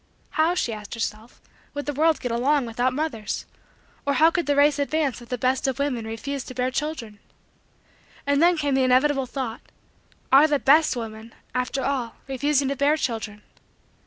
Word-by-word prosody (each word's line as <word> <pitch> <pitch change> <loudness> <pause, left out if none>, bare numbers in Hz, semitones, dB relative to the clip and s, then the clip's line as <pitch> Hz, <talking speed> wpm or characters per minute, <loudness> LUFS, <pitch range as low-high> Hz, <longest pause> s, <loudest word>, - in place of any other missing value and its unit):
"How," 325 +2 +2
she 240 -10 -1
asked 210 +1 -7
herself, 225 0 -5 0.4
"would 290 - -4
the 290 - -2
world 315 +3 +2
get 245 - -2
along 265 +4 +2
without 245 +2 0
mothers? 260 -6 -3 0.6
Or 285 - +1
how 320 +3 +5
could 345 -2 -1
the 290 - +2
race 290 +1 +4
advance 285 -3 0
if 235 - -13
the 250 - -2
best 255 +2 +1
of 265 - -1
women 260 -6 -2
refused 270 +5 -5
to 255 - -8
bear 255 0 0
children?" 255 -8 -4 1.1
And 285 +1 +2
then 345 0 +5
came 290 -2 0
the 265 - +3
inevitable 265 +1 +3
thought: 250 -3 -4 0.7
are 280 +4 +7
the 295 -1 +2
best 300 +3 +4
women, 225 -1 -7 0.2
after 250 +2 -1
all, 255 -5 -2
refusing 275 +1 +1
to 280 - -1
bear 285 +3 +2
children? 215 -6 -4
270 Hz, 180 wpm, -24 LUFS, 240-290 Hz, 1.1 s, are